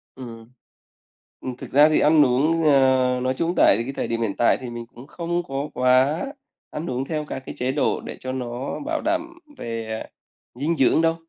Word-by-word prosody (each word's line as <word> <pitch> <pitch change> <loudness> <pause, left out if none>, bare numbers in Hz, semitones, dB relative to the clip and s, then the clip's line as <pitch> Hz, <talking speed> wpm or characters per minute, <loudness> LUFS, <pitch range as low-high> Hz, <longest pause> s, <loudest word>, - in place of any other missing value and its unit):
Ừm. 115 -2 -10 0.9
Ừm, 130 -1 -5
thực - - -9
ra 145 +3 +6
thì 155 - +3
ăn 150 -1 +5
uống, 150 +6 +2
ờ, 130 -3 +3
nói 130 0 +1
chung 165 +6 -1
tại 100 - +5
cái 130 - -5
thời - - -2
điểm 115 0 -2
hiện 105 -4 -1
tại 120 - +3
thì 125 - -6
mình 120 0 -7
cũng 120 +3 -14
không 175 +2 -3
có 140 0 -4
quá 130 +5 +3 0.5
ăn 160 +3 -5
uống 130 +2 -2
theo 155 0 -3
các 140 - -5
cái - - -7
chế 125 +1 0
độ 140 +1 0
để - - -7
cho 130 - -5
nó 125 0 -4
bảo 315 -1 -2
đảm 330 +1 -1 0.2
về, 115 - -5 0.2
à, - - -8 0.5
dinh 155 +6 -1
dưỡng 135 +4 +4
đâu. 165 0 +2
135 Hz, 205 wpm, -23 LUFS, 125-155 Hz, 0.9 s, ra